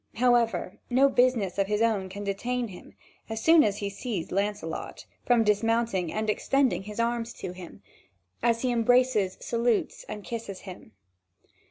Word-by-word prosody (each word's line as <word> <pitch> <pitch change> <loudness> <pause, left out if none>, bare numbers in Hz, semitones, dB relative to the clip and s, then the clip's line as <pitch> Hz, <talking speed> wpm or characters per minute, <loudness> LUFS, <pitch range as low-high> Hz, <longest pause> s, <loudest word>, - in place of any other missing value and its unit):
However, 240 -1 +1
no 265 +3 +4
business 245 -8 +2
of 195 - +2
his 210 +2 +1
own 205 -5 +1
can 200 +2 -7
detain 235 +4 -2
him, 180 - -13 0.3
as 220 0 -3
soon 320 +5 +6
as 205 -1 0
he 200 -1 -3
sees 200 -4 -4
Lancelot, 200 -4 -3 0.2
from 240 -2 +4
dismounting 210 -4 +1
and 215 0 -2
extending 265 +4 +1
his 210 +3 -8
arms 235 0 -1
to - - -6
him, 180 - -11 0.6
as 230 0 +1
he 255 - +1
embraces, 240 -4 +2
salutes 235 -2 0
and 210 -1 -6
kisses 225 -5 -6
him. 180 - -11
225 Hz, 155 wpm, -27 LUFS, 200-240 Hz, 0.6 s, soon